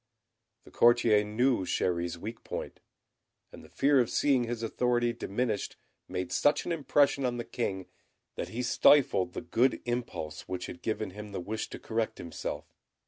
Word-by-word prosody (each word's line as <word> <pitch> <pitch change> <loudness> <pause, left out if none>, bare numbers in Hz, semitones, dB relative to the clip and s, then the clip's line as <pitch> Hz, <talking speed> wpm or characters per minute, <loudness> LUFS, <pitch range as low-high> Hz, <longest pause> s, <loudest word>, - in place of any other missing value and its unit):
The - - -16
courtier 120 -3 +5
knew 115 +1 +1
Chéri's 85 -1 -1
weak 110 +6 -7
point; - - -6 0.7
and - - -12
the - - -15
fear 140 0 +3
of 120 - +2
seeing 135 -4 +2
his 115 0 -4
authority 120 +1 +1
diminished 110 -1 -2 0.3
made 90 -1 -4
such 145 - +2
an - - -2
impression 145 -3 +2
on 125 -1 0
the 120 - -4
King, 95 -6 -3 0.5
that - - -5
he 120 +3 -3
stifled 120 -8 +4
the - - -4
good 125 +2 +2
impulse 120 -11 -4
which 90 0 -4
had 85 - -9
given 110 -1 -2
him 105 +1 -9
the - - -3
wish 110 +5 -4
to - - -7
correct 115 -1 -2
himself. 85 -1 -6
115 Hz, 165 wpm, -30 LUFS, 95-125 Hz, 0.7 s, courtier